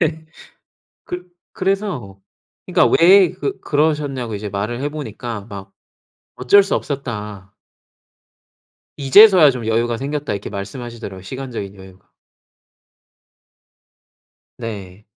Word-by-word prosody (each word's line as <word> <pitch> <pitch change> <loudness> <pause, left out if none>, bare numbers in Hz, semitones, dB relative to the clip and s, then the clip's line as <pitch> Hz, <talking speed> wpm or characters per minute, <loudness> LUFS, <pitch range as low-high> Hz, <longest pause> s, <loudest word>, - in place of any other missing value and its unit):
네. 160 -1 -1 0.8
그 180 0 -6 0.3
그래서 185 - -2 0.5
그니까 - - +3
왜 185 +1 +7
그 405 - -4
그러셨냐고 145 -6 -1
이제 105 +1 -5
말을 105 +5 -3
해 145 - 0
보니까 120 -7 -6
막 100 -1 -9 0.6
"어쩔 130 +11 +5
수 200 - -3
없었다." 105 -8 -5 1.4
"이제서야 165 +3 +7
좀 125 -3 -6
여유가 115 +1 0
생겼다." 145 -1 -3
이렇게 100 - -5
말씀하시더라고요 100 0 -7
시간적인 115 -3 -6
여유가. 95 -1 -16 2.5
네. 105 -4 -8
120 Hz, 235 characters per minute, -19 LUFS, 100-150 Hz, 2.5 s, 왜